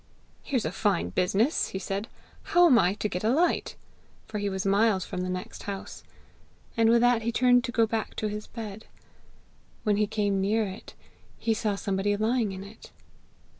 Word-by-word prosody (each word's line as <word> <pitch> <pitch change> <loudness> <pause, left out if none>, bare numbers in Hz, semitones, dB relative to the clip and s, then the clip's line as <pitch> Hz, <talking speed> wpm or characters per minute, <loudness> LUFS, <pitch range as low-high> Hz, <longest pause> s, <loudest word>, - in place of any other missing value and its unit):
'Here's 255 -6 -1
a 155 - -1
fine 200 +2 0
business!' 195 - +1
he - - -5
said. 195 +3 -3 0.3
'How 350 0 +4
am 255 -9 +6
I 185 +1 +2
to 210 - -2
get 180 -2 -4
a 220 - +2
light?' 330 +8 +1 0.5
For 210 - -4
he 205 0 -1
was 190 0 -3
miles 200 -1 +3
from 180 - -4
the 185 - -3
next 185 0 -5
house. 195 -1 -6 0.7
And 225 -1 +4
with 235 0 +5
that 245 -1 +4
he 230 +1 -1
turned 245 +1 +4
to 240 - -4
go 230 -1 +3
back 220 0 -3
to 215 - -2
his 210 0 -5
bed. 220 -2 -8 1.0
When 210 -1 +2
he 210 0 +2
came 200 -2 0
near 215 +3 +1
it, 195 +1 -9 0.4
he 225 - 0
saw 210 -1 -1
somebody 200 +1 -1
lying 220 0 +1
in 190 0 -7
it. 205 +3 -13
210 Hz, 190 wpm, -27 LUFS, 195-230 Hz, 1.0 s, am